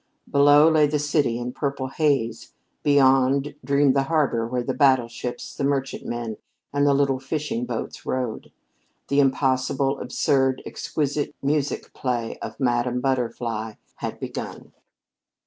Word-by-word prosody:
Below 145 +2 +6
lay 155 -2 +4
the 150 +1 0
city 145 -5 +1
in 120 +1 -4
purple 140 -2 -3
haze; 135 -6 0 0.3
beyond 135 0 +3
dreamed 140 -1 +3
the 135 - +4
harbor 140 -8 +1
where 125 +1 -2
the 130 - -2
battleships, 125 -3 +1
the - - -4
merchantmen 120 -5 -2 0.4
and 145 0 +2
the 140 - +5
little 135 -2 +2
fishing 135 -3 -3
boats 115 -2 -5
rode. 125 -4 -3 0.6
The 140 - +3
impossible, 135 0 +1
absurd, 135 -1 +1
exquisite 145 -1 -2
music 145 0 -1
play 120 -3 -3
of - - -7
"Madame 125 -1 +1
Butterfly" 115 -4 -2 0.2
had - - -5
begun. - - -6
135 Hz, 130 wpm, -24 LUFS, 125-145 Hz, 0.6 s, Below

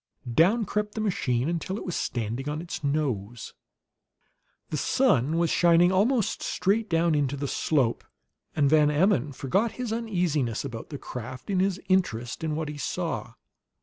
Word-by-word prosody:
Down 200 - +4
crept 210 +2 -2
the - - -3
machine 130 - 0
until 170 +3 -2
it - - -7
was 180 - -3
"standing 120 +4 -2
on 150 +1 -3
its 170 -2 -6
nose." 125 -7 -2 1.2
The 155 - -1
sun 155 - +2
was 170 -1 +2
shining 175 +1 +5
almost 215 +4 +1
straight 215 +3 0
down 165 0 +2
into 145 -2 0
the 140 +1 -3
slope, 135 -5 0 0.5
and 145 -2 +3
Van 150 0 +5
Emmon 150 - +2
forgot 195 - 0
his 245 -2 -3
uneasiness 175 - -1
about 120 -4 -7
the 145 - -5
craft 130 - -7
in 190 - +1
his 190 0 +1
interest 145 -11 0
in 155 -2 -1
what 160 0 -2
he 150 0 -6
saw. - - -3
155 Hz, 160 wpm, -27 LUFS, 135-190 Hz, 1.2 s, shining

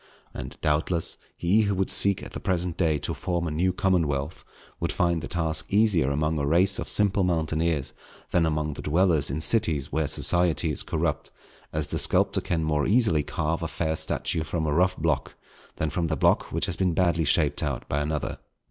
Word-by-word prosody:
And, - - -7
doubtless, 80 +3 0 0.2
he 95 +6 +3
who 100 -2 0
should 95 0 0
seek 100 -1 +1
at - - -9
the - - -6
present 90 -2 -1
day 80 -4 +1
to - - -4
form 85 -2 -2
a 80 - -2
new 90 +5 +1
commonwealth, 80 -7 0 0.4
would - - -1
find 85 -2 +1
the - - -5
task 80 -3 -1
easier 100 -9 +3
among 75 +2 0
a 70 - -1
race 90 +5 +3
of - - -3
simple 100 -1 +3
mountaineers, 80 -3 0 0.4
than 85 -2 +3
among 75 -1 -1
the - - -8
dwellers 80 -2 +2
in 75 +4 -3
cities 80 -9 +1
where 80 -1 0
society 85 +1 +1
is 70 - -1
corrupt; - - -2 0.4
as 75 -1 -1
the - - -3
sculptor - - +2
can 85 -2 -1
more 75 -2 0
easily 105 -9 +3
carve 80 +3 -2
a 80 - -2
fair 80 -1 -2
statue 80 - -2
from 80 0 -2
a 75 - 0
rough 90 +3 +2
block, - - -1 0.4
than 80 -2 -2
from 85 -2 -1
the 80 -2 -1
block - - +2
which - - -1
has - - -3
been 90 -3 +1
badly 85 -2 +2
shaped 75 -1 +1
out 70 -5 -3
by 70 - -1
another. 75 0 -3
80 Hz, 200 wpm, -26 LUFS, 75-90 Hz, 0.4 s, he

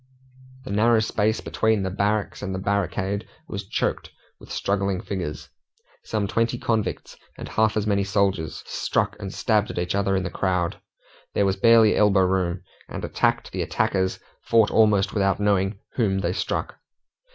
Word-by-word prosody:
The 130 - -7
narrow 110 +3 +4
space 110 0 0
between 110 -2 +1
the 95 - -2
barracks 100 +2 -1
and 95 -2 -3
the 95 - -6
barricade 100 0 -1 0.2
was 100 -2 -6
choked - - -2 0.3
with - - -15
struggling 100 -1 -1
figures. 90 -7 -5 0.6
Some 105 -2 -1
twenty 115 +4 0
convicts, 110 -3 -2 0.2
and - - -7
half 110 0 +1
as 105 - 0
many 100 -2 +1
soldiers, 95 -4 0
struck - - -1
and 95 - -5
stabbed 105 0 +1
at - - -6
each 90 0 -1
other 100 0 +1
in 95 - 0
the 85 - -4
crowd. 90 -3 -1 0.5
There 100 - +3
was 95 -1 +1
barely 115 +1 +5
elbow 100 -2 +4
room, 90 -1 0 0.3
and - - -5
attacked - - 0
and - - -2
attackers 95 -1 0 0.2
fought 115 -2 +3
almost 105 -3 +3
without 100 -2 +1
knowing 100 -1 +1 0.2
whom 100 -6 +1
they 85 0 0
struck. - - -3
100 Hz, 165 wpm, -24 LUFS, 95-110 Hz, 0.6 s, barely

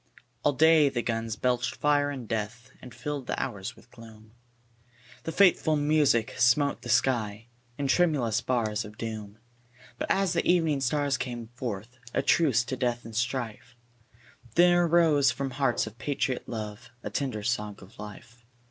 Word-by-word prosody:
ALL 145 - +2
day 155 0 +5
the 120 -3 -2
guns 115 -1 -2
belched 125 +1 0
fire 145 -1 +2
and 130 -5 -6
death 115 +2 -4
And 125 - -11
filled 135 +2 -5
the - - -2
hours 115 -3 -4
with 120 - -20
gloom; 110 -2 -14 0.9
The 165 - -2
fateful 175 -4 +4
music 145 -5 +2
smote 140 +4 +3
the 120 - -8
sky 115 -4 +1 0.3
In 145 - -2
tremulous 135 -7 +2
bars 110 -3 0
of 105 0 -11
doom; 110 -2 -6 0.6
But - - -3
as 195 -3 +2
the 170 - +1
evening 160 -5 +2
stars 140 +2 +1
came 120 -3 -5
forth 120 0 -6 0.2
A - - +1
truce 135 -8 +3
to 130 - -4
death 120 -2 -1
and 115 -1 -9
strife, 120 -1 -3 0.8
There 175 0 +5
rose 160 -4 +4
from 140 -1 -3
hearts 130 -1 +1
of 110 - -11
patriot 135 -3 -2
love 110 0 -6
A - - -5
tender 125 -7 -2
song 105 -3 -1
of - - -16
life. 115 +3 -11
125 Hz, 160 wpm, -28 LUFS, 115-145 Hz, 0.9 s, day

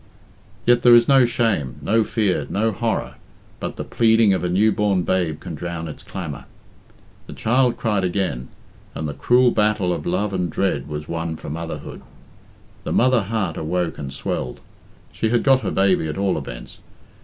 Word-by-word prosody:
Yet 120 0 +4
there 120 -1 +8
is 120 0 +5
no 135 -3 +5
shame, 90 - 0
no 110 +10 +2
fear, 105 -4 0
no 110 +2 +1
horror, 115 +2 -2 0.4
but - - -5
the - - -5
pleading 110 -3 +3
of 95 - -1
a 90 - 0
new 105 +5 +3
born 100 -3 +1
babe 85 -4 0
can - - -7
drown 85 +1 -5
its 75 - -9
clamour. 75 -8 -7 0.8
The - - -8
child 125 +2 +1
cried 105 -4 0
again, 90 -9 -1 0.5
and 80 - -3
the 75 - -4
cruel 120 - +3
battle 105 -5 +1
of - - -5
love 100 +3 -1
and 90 -2 -1
dread 80 -5 -1
was 75 0 -5
won 85 -1 -3
for 80 - -8
motherhood. 85 +1 -6 0.8
The - - -4
mother 130 -1 +3
heart 100 -4 -2
awoke 85 +2 -2
and 70 -2 -5
swelled. - - -4 0.5
She 110 - -1
had 120 +1 +2
got 135 -2 +4
her - - -2
baby, 95 -4 +2
at 75 - -4
all 100 -1 +1
events. - - -8
95 Hz, 180 wpm, -21 LUFS, 80-115 Hz, 0.8 s, there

